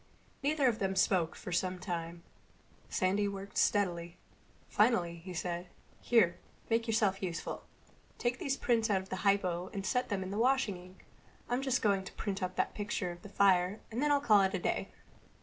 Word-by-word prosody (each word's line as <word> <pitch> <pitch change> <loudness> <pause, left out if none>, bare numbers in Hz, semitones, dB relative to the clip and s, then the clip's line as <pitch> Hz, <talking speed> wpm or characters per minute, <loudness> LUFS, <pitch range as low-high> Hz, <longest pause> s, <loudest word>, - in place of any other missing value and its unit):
Neither 285 0 +1
of 230 -3 +1
them 195 -1 0
spoke 185 -3 +2
then - - -12
for - - -5
some 180 +2 0
time. 170 -2 -5 0.7
Sandy 195 +2 +1
worked 200 0 -4
steadily. 175 -4 +1 0.5
Finally 180 -6 +2
he 180 +3 -9
said, 175 0 -3 0.3
"Here, 220 -8 +3 0.3
make 230 +1 +2
yourself 210 -3 +1
useful. 175 -3 -4 0.5
Take 240 0 -1
these 275 -1 -1
prints 230 -2 +1
out 190 -2 +2
of 190 - -16
the 185 - -3
hypo 185 -3 +1
and 195 -1 -4
set 250 +5 0
them 200 -3 -1
washing 240 0 +2
in - - -11
the - - -13
sink. - - -22 0.4
I'm 245 +2 0
just 265 -2 0
going 200 -3 +2
to - - -9
print 200 -2 -3
up 185 0 -2
that - - 0
picture 205 -3 -2
of 175 0 -10
the 205 - -11
fire 190 0 +3
and 235 +4 -2
then 295 0 +2
I'll 285 - +4
call 215 -8 +5
it 190 0 +1
a - - -1
day." - - -1
195 Hz, 195 wpm, -32 LUFS, 180-225 Hz, 0.7 s, call